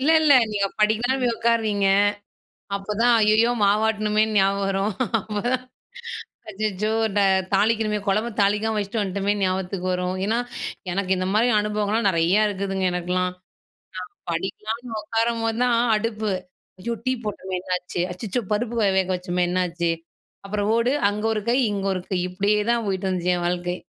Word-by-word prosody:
இல்ல 285 +4 +2
,இல்ல. 310 -2 +5 0.2
நீங்க 200 -1 +1
படிக்கலாம்ன்னு 230 +5 +2
போய் 240 -2 +2
உட்காருவீங்க. 220 -4 +1 0.9
அப்போதான் 210 +4 +1
ஐயயோ! 220 +3 +4
மாவாட்டணுமேன்னு 215 +1 +2
ஞாபகம் 195 +1 +2
வரும். 195 +2 0 0.3
அப்போதான், 235 +5 -2 0.9
"அச்சச்சோ! 215 0 -2 0.3
ட - - +5 0.4
தாளிக்கணுமே, 215 +1 +2
கொழம்ப 215 +4 +1
தாளிக்காம 210 +2 +1
வச்சுட்டு 210 +2 -1
வந்துட்டோமே" 200 +1 0
ஞாபகத்துக்கு 185 0 -1
வரும். 180 0 -1
ஏன்னா, 225 +3 +1 0.5
எனக்கு 190 0 -2
இந்த 185 0 -1
மாரி 230 +3 +3
அனுபவங்கள்லாம் 210 +1 0
நெறையா 175 +4 +3
இருக்குதுங்க, 195 -1 -2
எனக்கெல்லாம். 180 +1 -1 0.9
நான் 170 - -1
படிக்கலாம்ன்னு 220 +6 -4
உக்காரம்போது 225 0 0
தான், 240 -2 +3 0.2
அடுப்பு 215 -1 -2 0.5
"ஐயோ 235 +4 -2
டீ 255 - +2
போட்டோமே 190 -3 -4
என்னாச்சு? 180 -1 -3
அச்சச்சோ! 220 +5 -3
பருப்பு 235 +2 -2
வ 205 - +4
வேக 190 0 +1
வச்சோமே 180 0 -1
என்னாச்சு?" 175 -2 0 0.5
அப்புறம் 205 +1 -1
ஓடு. 235 +2 +2 0.2
அங்கே 210 +2 -2
ஒரு 215 - -2
கை, 245 - +3 0.2
இங்க 195 -1 -3
ஒரு 185 - -3
கை. 190 - 0
இப்படியே 200 +3 +1
தான் 235 -2 0
போய்ட்டுருந்துச்சு, 185 -2 0
என் 175 - -2
வாழ்க்கை. 180 0 -2
205 Hz, 145 wpm, -23 LUFS, 190-220 Hz, 0.9 s, இல்ல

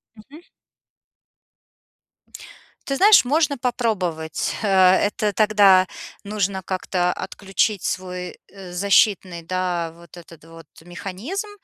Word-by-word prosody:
Мгм. 270 +9 -15 2.4
Ты 275 - -2
знаешь, 400 0 +6
можно 290 +1 +1
попробовать. 195 -11 -2
Э, - - 0 0.3
это 205 +1 -1
тогда 200 -3 +4 0.4
нужно 200 -2 -2
как-то 180 -1 -1
отключить 195 +1 -2
свой 180 -1 -5
защитный, 190 -1 0
да, 175 -1 -3
вот 170 -1 -17
этот 165 -2 -15
вот 165 -1 -14
механизм 200 - -6
190 Hz, 95 wpm, -21 LUFS, 175-215 Hz, 2.4 s, знаешь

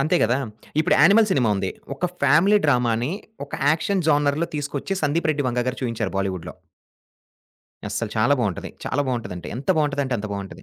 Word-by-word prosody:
అంతే 155 +6 +2
గదా! 120 +3 +3 0.4
ఇప్పుడు 155 - +2
'యానిమల్' 210 +7 +6
సినిమా 125 -10 +2
ఉంది. 95 -1 -2 0.2
ఒక 160 +7 -1 0.2
ఫ్యామిలీ 165 +10 +5
డ్రామా‌ని 125 -2 +2 0.3
ఒక 140 - -21 0.2
యాక్షన్ 170 +4 0
జోనర్‌లో 145 +2 +2
తీసుకొచ్చి, 145 +4 -3
'సందీప్ 155 +2 +1
రెడ్డి 145 -2 -2
వంగ' 125 0 -1
గారు 130 - -4
చూయించారు 115 -5 -2
బాలీవుడ్‌‌‌‌‌లో. 95 -3 -3 1.3
అస్సలు - - -3
చాలా - - +3
బావుంటది. - - -2
చాలా 145 - -1
బావుంటది 120 -6 -3
అంటే 85 - -8
ఎంత 135 - -8
బావుంటదంటే, 140 -3 0
అంత 105 - -4
బావుంటది. 100 -1 -7
140 Hz, 165 wpm, -23 LUFS, 120-155 Hz, 1.3 s, యానిమల్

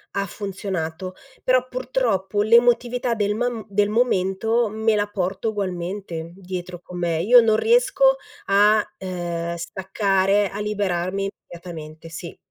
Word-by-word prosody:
ha 200 -1 0
funzionato, 185 -3 -4 0.3
però 255 0 +3
purtroppo 235 -6 0
l'emotività 240 +1 +3
del 205 -1 0
mam 240 0 -2
del 205 +1 +1
momento 225 0 +1
me 220 +1 +1
la 205 0 +1
porto 195 +2 -2
ugualmente 180 -4 -4
dietro 180 -2 -7
con 180 -1 -8
me. 165 -2 0
Io 240 +3 +8
non 220 -1 +3
riesco - - +4 0.3
a, 210 +2 +4
ehm, 170 -2 -4
staccare, 195 +2 +1
a 200 - -6
liberarmi 195 -2 -1 0.2
immediatamente, 165 -2 -9
sì. 170 +1 -8
200 Hz, 125 wpm, -23 LUFS, 180-220 Hz, 0.3 s, Io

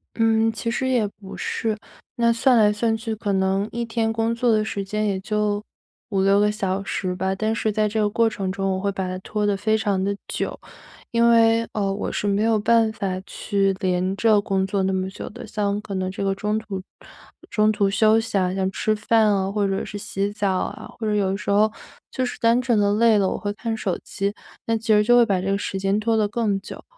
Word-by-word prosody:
嗯， 225 0 +3
其 230 +1 -3
实 260 +2 -1
也 240 -5 +2
不 195 -1 -11
是。 220 -2 -2 0.4
那 235 -1 +3
算 250 +1 +3
来 210 -1 +5
算 225 +1 0
去， 225 0 -4
可 205 -2 -2
能 190 +2 +1
一 235 0 -3
天 225 -1 -1
工 225 +1 0
作 235 0 +1
的 215 -1 +2
时 200 -2 -3
间 215 +2 -2
也 195 -2 0
就 210 0 -1 0.5
5-6 195 0 +3
个 210 0 +3
小 195 -2 -2
时 185 -1 -2
吧。 190 +1 -1
但 215 +3 -1
是 220 -1 0
在 215 0 +1
这 215 +1 -2
个 205 - +2
过 230 +2 +2
程 195 -3 -3
中， 195 0 -1
我 185 - -2
会 200 +1 -1
把 190 -1 -3
它 185 0 -4
拖 210 +2 -2
得 205 -1 +2
非 220 +2 +1
常 200 -3 0
地 200 +1 0
久。 - - -3 0.5
因 235 0 +4
为， 230 0 +5
呃， 195 -2 0
我 200 - -3
是 - - -3
没 200 +1 +1
有 225 0 +3
办 225 +1 +3
法 190 -3 -3
去 195 -2 0
连 185 +1 0
着 215 -1 +3
工 195 -2 0
作 195 0 -1
那 190 - +1
么 185 0 -1
久 195 - -8
的， - - -10
像 205 -1 -1
可 200 - -7
能 185 0 -1
这 195 - -4
个 195 0 +1
中 210 +2 -1
途 195 -4 -6 0.7
中 215 0 +3
途 205 -2 +1
休 215 +2 +4
息 225 -2 -5
啊， 185 -1 +1
像 190 -1 0
吃 215 +2 0
饭 215 0 +3
啊， 195 -1 0
或 205 -1 0
者 195 0 -2
是 205 - -6
洗 200 -1 -2
澡 205 -2 0
啊， - - -4
或 220 - -3
者 210 - +1
有 195 -2 +1
的 195 - -2
时 200 - -6
候 210 +2 +4 0.4
就 255 - -1
是 245 - -5
单 230 +1 +4
纯 240 -3 +1
地 205 0 +3
累 225 -1 +4
了， 190 -1 +2
我 - - -2
会 205 0 -3
看 225 +1 -3
手 190 -4 -1
机， 200 +1 -2 0.3
那 230 - +1
其 225 +1 -10
实 210 -1 +5
就 240 +3 +4
会 240 - +7
把 195 -4 +1
这 190 +2 -2
个 200 - +1
时 195 -1 -4
间 195 +2 +1
拖 225 +1 +1
得 210 -1 +2
更 205 -2 0
久。 - - -10
210 Hz, 260 characters per minute, -23 LUFS, 195-225 Hz, 0.7 s, 会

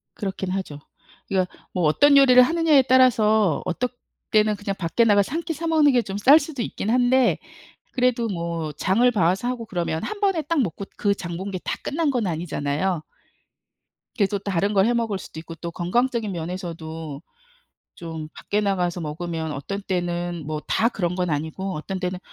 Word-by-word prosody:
그렇긴 190 -2 -4
하죠. 185 -7 -4 0.5
그러니까 185 -2 0 0.2
뭐 180 - -1
어떤 280 - +5
요리를 255 -2 +8
하느냐에 315 -1 +4
따라서 220 - +4
어떨 245 +8 -1 0.4
때는 215 -1 +3
그냥 200 -1 -3
밖에 170 +6 +1
나가서 205 +1 +3
1 330 - 0
끼 325 - -3
사 330 +2 -4
먹는 310 -3 +4
게 245 -2 +3
좀 195 -2 -5
쌀 280 +9 +7
수도 285 -4 -5
있긴 215 - -3
한데 250 +1 +3 0.6
그래도 250 -2 +1
뭐 170 -3 -3
장을 205 - +2
봐 205 -6 0
와서 190 +7 +1
하고 245 -2 -3
그러면 170 -5 -2
1 425 - -4
번에 385 -5 +2
딱 310 -2 +1
먹고 200 -1 -3
그 205 -1 +2
장 170 -2 -6
본 195 +2 -5
게 185 - -4
다 - - -2
끝난 300 -1 0
건 235 -6 0
아니잖아요. 160 +1 -2 1.1
계속 200 -3 +1
다른 200 +1 0
걸 195 -1 +4
해 240 - +2
먹을 225 -4 -1
수도 160 - -9
있고 165 0 -9
또 170 0 -6
건강적인 225 +5 0
면에서도 165 -3 -6 0.7
좀 160 -2 -7
밖에 210 - -2
나가서 180 -3 0
먹으면 160 0 -4
어떤 195 +9 -5
때는 175 -3 -3
뭐 155 -1 -3
다 230 - +2
그런 180 -5 -2
건 180 -2 -1
아니고 160 +6 -3
어떤 185 +5 -5
때는 180 0 -3
195 Hz, 335 characters per minute, -23 LUFS, 170-240 Hz, 1.1 s, 요리를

